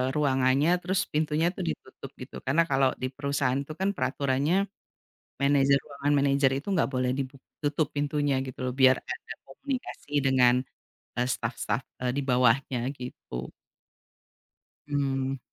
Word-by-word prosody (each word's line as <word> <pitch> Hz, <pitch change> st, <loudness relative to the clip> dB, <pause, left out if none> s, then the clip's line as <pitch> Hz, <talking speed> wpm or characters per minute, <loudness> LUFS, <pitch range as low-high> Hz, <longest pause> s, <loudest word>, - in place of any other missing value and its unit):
ruangannya, 135 Hz, 0 st, +3 dB
terus 190 Hz, +2 st, 0 dB
pintunya 155 Hz, +2 st, +2 dB
tuh -, -, -4 dB
ditutup 75 Hz, -, -6 dB
gitu. -, -, -9 dB
Karena 155 Hz, +6 st, +4 dB
kalau 135 Hz, -1 st, +4 dB
di 130 Hz, -, 0 dB
perusahaan 140 Hz, -1 st, 0 dB
itu 140 Hz, +2 st, -5 dB
kan 195 Hz, +1 st, +2 dB
peraturannya, 140 Hz, +3 st, +1 dB, 0.9 s
manajer 140 Hz, 0 st, +4 dB
ruangan 145 Hz, 0 st, -1 dB
manajer 140 Hz, -1 st, +3 dB
itu 140 Hz, -, -10 dB
nggak 165 Hz, -, +2 dB
boleh 130 Hz, 0 st, +1 dB
dibuk 135 Hz, 0 st, -4 dB, 0.2 s
tutup 145 Hz, +1 st, +1 dB
pintunya 145 Hz, 0 st, +1 dB
gitu 130 Hz, -, -8 dB
loh, 125 Hz, -, -2 dB
biar 130 Hz, -1 st, +6 dB
ada -, -, -6 dB
komunikasi 250 Hz, -, -6 dB
dengan, 125 Hz, -2 st, +5 dB, 0.7 s
eee, 125 Hz, -, +2 dB
staf-staf, 115 Hz, +1 st, -2 dB, 0.2 s
eee, 125 Hz, 0 st, +1 dB
di -, -, +1 dB
bawahnya 125 Hz, 0 st, +3 dB, 0.2 s
gitu. 65 Hz, -, -7 dB, 1.4 s
Mmm. 135 Hz, -2 st, -1 dB
135 Hz, 135 wpm, -28 LUFS, 130-145 Hz, 1.4 s, biar